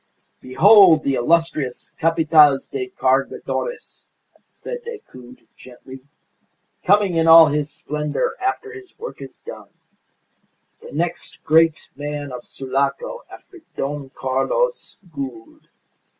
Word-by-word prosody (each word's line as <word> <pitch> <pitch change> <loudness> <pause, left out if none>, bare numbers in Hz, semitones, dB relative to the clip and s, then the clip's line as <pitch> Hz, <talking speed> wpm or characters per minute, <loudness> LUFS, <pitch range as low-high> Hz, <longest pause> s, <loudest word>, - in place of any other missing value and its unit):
"Behold 175 +3 +5
the 140 - 0
illustrious 150 -1 -1
Capataz 155 -4 +4
de 390 -2 -4
Cargadores," 485 +5 -3 0.5
said 485 -1 -8
Decoud, 130 - -12
gently, 130 +1 -13 0.8
"coming 200 -1 +3
in 165 0 +1
all 165 0 +9
his 150 0 -2
splendour 150 0 -3
after 415 +3 -3
his 385 -3 -14
work 475 +3 -9
is - - -11
done. - - -10 1.1
The - - -12
next 170 +3 -5
great 160 0 +2
man 145 0 -6
of 125 -1 -9
Sulaco 140 - -3
after 370 - -15 0.2
Don 140 -1 -4
Carlos 135 - -2 0.2
Gould. 130 -6 -8
155 Hz, 105 wpm, -20 LUFS, 135-210 Hz, 1.1 s, all